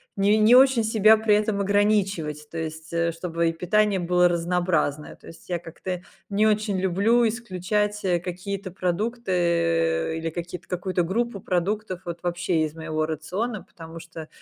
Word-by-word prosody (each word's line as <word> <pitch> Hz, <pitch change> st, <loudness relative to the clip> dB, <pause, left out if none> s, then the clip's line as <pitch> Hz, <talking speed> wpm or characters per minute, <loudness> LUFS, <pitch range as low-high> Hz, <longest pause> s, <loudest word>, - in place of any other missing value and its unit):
не 205 Hz, +2 st, +3 dB
не 220 Hz, +3 st, +6 dB
очень 260 Hz, -3 st, +6 dB
себя 220 Hz, 0 st, +5 dB
при 215 Hz, -1 st, +3 dB
этом 210 Hz, -1 st, 0 dB
ограничивать. 195 Hz, -7 st, 0 dB
То 165 Hz, -, -7 dB
есть, 160 Hz, 0 st, -6 dB
э, 170 Hz, 0 st, +1 dB
чтобы 165 Hz, 0 st, -1 dB
и -, -, -3 dB
питание 200 Hz, +3 st, +1 dB
было 180 Hz, 0 st, +3 dB
разнообразное. 170 Hz, -3 st, -1 dB
То -, -, -18 dB
есть 165 Hz, -, -14 dB
я 175 Hz, -1 st, -1 dB
как-то 175 Hz, +2 st, -6 dB, 0.3 s
не 205 Hz, +1 st, +2 dB
очень 210 Hz, -2 st, +1 dB
люблю 200 Hz, +6 st, +2 dB
исключать, 210 Hz, -1 st, -2 dB
э, 175 Hz, -2 st, +2 dB
какие-то 185 Hz, +2 st, -5 dB
продукты, 170 Hz, -5 st, 0 dB
или 165 Hz, 0 st, -3 dB
какие-то 175 Hz, +1 st, -7 dB
какую-то 180 Hz, 0 st, -1 dB
группу 230 Hz, +4 st, -1 dB
продуктов 185 Hz, +1 st, -2 dB
вот 170 Hz, 0 st, -5 dB
вообще 175 Hz, -2 st, 0 dB
из 150 Hz, -, -6 dB
моего 155 Hz, -1 st, -2 dB
рациона. 185 Hz, +8 st, -3 dB
Потому 165 Hz, 0 st, -11 dB
что 165 Hz, -1 st, -10 dB
180 Hz, 160 wpm, -24 LUFS, 165-210 Hz, 0.3 s, не